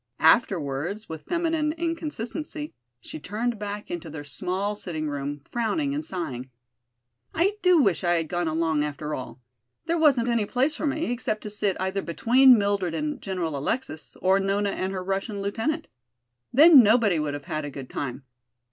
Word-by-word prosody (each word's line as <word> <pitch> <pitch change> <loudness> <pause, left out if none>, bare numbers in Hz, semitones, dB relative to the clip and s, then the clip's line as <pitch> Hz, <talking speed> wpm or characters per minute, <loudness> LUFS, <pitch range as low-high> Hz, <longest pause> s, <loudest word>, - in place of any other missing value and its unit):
Afterwards, 170 - +2
with 160 -1 -8
feminine 325 -3 0
inconsistency, 315 -2 -4 0.3
she - - -8
turned 220 +7 -3
back 205 0 -5
into 170 -2 -5
their 145 -1 -7
small 185 +8 -2
sitting 165 -6 -4
room, 145 0 -4
frowning 280 +5 0
and 300 +2 -2
sighing. 135 - -5 0.9
"I 395 +5 +2
do 365 -1 +5
wish 195 - +2
I 175 -1 +3
had 165 -2 0
gone 175 +1 -1
along, 160 -1 +1
after 150 +1 -4
all. 130 -1 -7 0.4
There 335 +1 0
wasn't 270 -7 +4
any 235 -3 +1
place 265 +7 +1
for 310 - -2
me, 310 +1 -1
except 235 -3 -2
to 210 - -5
sit 205 -2 0
either 190 +1 -1
between 245 +9 +5
Mildred 200 -4 0
and 295 - -3
General 180 -6 -3
Alexis, 155 - -3
or 190 +1 +4
Nona 200 +1 0
and 190 0 -2
her 185 -1 -4
Russian 195 +2 -2
lieutenant. 225 +11 -2 0.6
Then 300 +1 +9
nobody 215 -5 +4
would 150 -1 -2
have 145 - -8
had 155 -3 -3
a 145 - -4
good 135 -2 -8
time. 135 0 -5
200 Hz, 170 wpm, -26 LUFS, 160-260 Hz, 0.9 s, Then